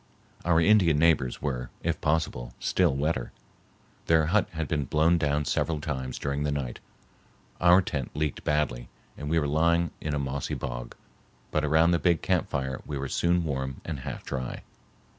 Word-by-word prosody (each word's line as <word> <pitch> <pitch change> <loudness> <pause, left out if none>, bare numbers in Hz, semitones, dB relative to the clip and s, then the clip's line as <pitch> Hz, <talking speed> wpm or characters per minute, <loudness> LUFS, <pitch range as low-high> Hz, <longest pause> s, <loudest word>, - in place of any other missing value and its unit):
Our 85 -2 +3
Indian 85 -4 +5
neighbors 75 -5 +2
were, 65 -4 -2
if - - -1
possible, 75 -6 -1
still 85 -7 +2
wetter. 70 -3 -1 0.8
Their 80 -1 +4
hut 100 +6 +2
had 80 -2 -3
been 75 -2 -1
blown 80 +5 +3
down 75 -1 +1
several 80 +3 0
times 65 -4 -4
during 70 0 -2
the 75 0 0
night. 65 -4 -3 0.8
Our 90 +2 +6
tent 70 -7 -4
leaked 75 -1 -2
badly, 70 -5 0 0.3
and 75 - -6
we 80 - +2
were 75 - +2
lying 85 +3 +2
in 75 -1 -2
a - - 0
mossy 70 -1 -2
bog, - - -5 0.6
but 75 - +1
around 80 +3 +4
the 85 - +2
big 85 -2 +2
camp 90 -3 +1
fire 65 -2 -3
we 75 - -5
were 70 0 -4
soon 85 0 +2
warm 65 -3 -3
and 80 -5 -4
half 65 - -6
dry. 65 -2 -4
75 Hz, 175 wpm, -27 LUFS, 65-80 Hz, 0.8 s, Our